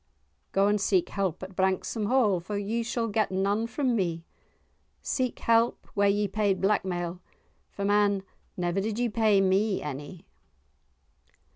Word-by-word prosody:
"Go 195 +1 +3
and 205 0 +2
seek 190 -3 +2
help 190 -3 -2
at 190 0 -9
Branksome 190 +3 0
Hall, 220 -7 +3
for 200 +4 -5
ye 210 +4 -1
shall 230 0 -2
get 215 -1 0
none 200 +4 0
from 255 -1 0
me—seek 185 +7 -5
help 230 +1 +2
where 200 0 +3
ye 205 +1 +1
paid 200 -1 0
blackmail, 180 -3 -1 0.5
for, 200 - -5
man, 205 -1 +2 0.3
never 175 +2 0
did 215 +1 -3
ye 240 0 +1
pay 215 -3 +3
me 195 +2 +2
any." 150 +4 -7
200 Hz, 140 wpm, -27 LUFS, 190-220 Hz, 0.5 s, Go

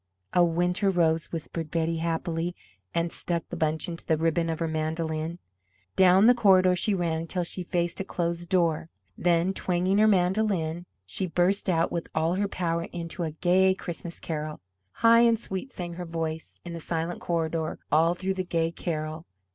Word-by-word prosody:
"A 175 - +5
winter 175 +3 +1
rose," 165 -3 +1
whispered 165 -1 -5
Betty, 165 +1 0
happily, 165 +1 -2 0.4
and 170 0 -1
stuck 170 -1 -3
the - - -5
bunch 155 -2 0
into 170 -1 -6
the 160 - +1
ribbon 165 +1 +1
of 160 - -1
her 165 - -1
mandolin. 160 +1 -2 0.6
Down 190 +2 +6
the 245 - +8
corridor 185 -5 +5
she 200 +3 +1
ran 170 -3 0
until 170 +2 -2
she 175 +2 -5
faced 175 -1 -1
a - - -1
closed 170 -2 -3
door. 165 -3 +1 0.3
Then, 175 +1 +2
twanging 185 +2 +1
her 215 - +6
mandolin, 180 -3 +1 0.2
she 185 - -3
burst 180 +4 +1
out 165 -1 +2
with 170 - -3
all 160 +2 +2
her 200 +2 0
power 170 -3 -2
into 170 +1 -6
a 165 - 0
gay 185 +4 +3
Christmas 170 -1 -6
carol. 155 -1 -4 0.3
High 230 - +5
and 230 -1 +5
sweet 195 +4 -5
sang 175 -1 -5
her 175 +1 -6
voice 160 -1 -4
in 175 - -6
the 170 - -5
silent 165 +1 -3
corridor 165 -2 -1
all 165 +3 +4
through 190 +1 -2
the 190 -1 -2
gay 165 -2 0
carol. 155 -1 -4
170 Hz, 180 wpm, -27 LUFS, 165-185 Hz, 0.6 s, the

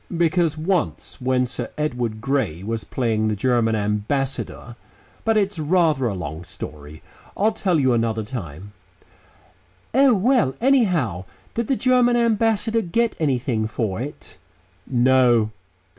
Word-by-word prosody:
"Because 165 -1 +2
once, 165 -4 -2
when 125 0 +1
Sir 125 - -4
Edward 120 -7 -2
Grey 125 - -1
was 110 +1 -3
playing 110 -2 -1
the 110 - 0
German 115 0 +1
Ambassador 115 +4 -2 0.5
but 225 -1 +2
it's 200 -4 0
rather 155 -4 +2
a 105 - -2
long 80 -2 -6
story. 75 -4 -9 0.3
I'll 215 +3 +3
tell 190 -6 0
you 130 -3 +3
another 115 -1 0
time." 100 - -7 1.2
"Oh! 265 -1 +5
Well, 195 - +2
anyhow, 180 - +2 0.3
did 235 -1 -2
the 270 - +2
German 250 -1 +3
Ambassador 225 -1 +2
get 225 +5 0
anything 125 -7 0
for 110 -2 -3
it?" 145 +3 -9 0.5
"No." 125 -3 +3
130 Hz, 130 wpm, -22 LUFS, -, 1.2 s, Oh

